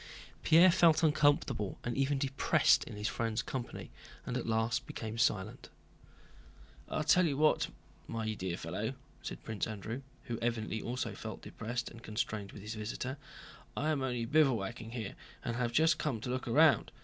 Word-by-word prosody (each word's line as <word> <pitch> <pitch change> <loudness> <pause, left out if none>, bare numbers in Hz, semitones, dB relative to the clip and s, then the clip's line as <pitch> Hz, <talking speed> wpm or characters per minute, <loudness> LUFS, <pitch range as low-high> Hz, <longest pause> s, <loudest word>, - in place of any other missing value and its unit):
Pierre 170 +3 +7
felt 165 -2 +5
uncomfortable 145 -9 +2
and 120 - -2
even 135 +1 +1
depressed 135 0 +3
in - - -8
his 105 +1 -2
friend's 115 -1 -1
company 125 -3 -5 0.3
and 125 - -3
at 125 - -2
last 115 +2 0
became 110 0 -5
silent. 105 -5 0 1.2
"I'll 155 - -1
tell 165 +4 +5
you 140 -3 -1
what, 155 +1 +3 0.4
my 110 -1 -2
dear 90 -4 -3
fellow," 105 +11 -3 0.3
said - - -7
Prince 110 -2 -2
Andrew, 110 +4 -5 0.2
who 120 -1 -4
evidently 110 -2 -1
also 125 +2 -3
felt - - -7
depressed 120 +2 -4
and 115 - -12
constrained 110 -2 -3
with 100 - -10
his 105 +2 -5
visitor, 115 +5 -4 0.6
"I 155 +2 +1
am 145 -3 0
only 125 -3 -1
bivouacking 115 -6 +1
here 110 -5 -4 0.3
and 120 - -1
have 120 -1 0
just 155 +4 +4
come 130 -7 -1
to 125 - -3
look 130 0 -3
round. 145 +5 +5
120 Hz, 165 wpm, -33 LUFS, 110-140 Hz, 1.2 s, Pierre